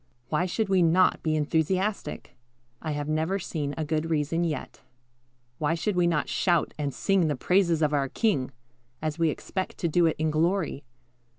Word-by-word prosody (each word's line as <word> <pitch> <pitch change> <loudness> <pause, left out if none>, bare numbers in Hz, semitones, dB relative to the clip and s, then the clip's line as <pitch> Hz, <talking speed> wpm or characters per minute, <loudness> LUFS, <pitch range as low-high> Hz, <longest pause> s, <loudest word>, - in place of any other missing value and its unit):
Why 170 +4 +1
should 215 +4 -1
we 190 -2 +3
not 175 +2 +4
be 155 -1 0
enthusiastic? 160 +4 -1 0.5
I 155 -2 -3
have 145 0 -3
never 160 +5 0
seen 150 -6 -4
a 160 - -2
good 155 +1 -1
reason 160 +2 0
yet. 155 -6 -4 0.8
Why 155 +2 +1
should 200 +4 -1
we 175 -1 +3
not 165 -4 +1
shout 175 -3 +1
and 145 -2 -2
sing 190 +2 +1
the 150 - 0
praises 170 +2 +2
of 150 0 +2
our 140 -2 +1
King, 190 - 0 0.5
as 155 +1 -3
we 165 -1 +3
expect 185 +5 -4
to 170 - -1
do 170 +1 +3
it 160 - 0
in 155 0 0
glory? 160 -2 0
160 Hz, 180 wpm, -27 LUFS, 150-180 Hz, 0.8 s, not